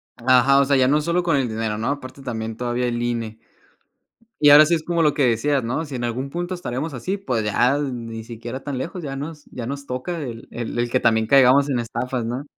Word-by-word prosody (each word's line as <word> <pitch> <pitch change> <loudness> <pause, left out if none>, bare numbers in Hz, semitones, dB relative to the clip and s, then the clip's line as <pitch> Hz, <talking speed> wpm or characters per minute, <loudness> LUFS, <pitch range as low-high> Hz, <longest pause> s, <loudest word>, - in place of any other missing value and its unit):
Ajá, 130 +3 +4
o 140 - +4
sea, 140 +1 +2
ya 130 -1 +4
no 150 +2 +3
solo 170 +3 0
con 165 -4 +2
el 130 -3 0
dinero, 110 -1 -2
¿no?, 110 - -2
aparte 135 -1 -5
también 110 -3 -4
todavía 125 0 -1
el 120 0 -2
INE. 115 -2 -3 1.0
Y 145 -1 +6
ahora 150 +1 +9
sí 170 - +1
es 160 - -4
como 170 0 0
lo 150 -2 +3
que 145 -2 +2
decías, 130 +4 +1
¿no?, 130 +8 -2
si 140 - -7
en 120 - -4
algún 125 +3 -3
punto 175 +4 -4
estaremos 155 -3 -4
así, 160 - -3
pues, 125 - -2
ya, 125 +6 +2
ni 115 -5 -5
siquiera 120 +3 -7
tan 140 -3 -4
lejos 170 +7 -5
ya 135 -2 -5
nos 150 +2 -7
ya 120 - -7
nos 140 +1 -5
toca 130 +7 -4
el 115 -4 -7
el 120 0 -5
el 120 0 0
que 130 +2 +1
también 110 -1 +2
caigamos 135 +2 +5
en 130 -3 0
estafas, 120 +1 -3
¿no? 125 +4 -3
130 Hz, 240 wpm, -22 LUFS, 120-145 Hz, 1.0 s, ahora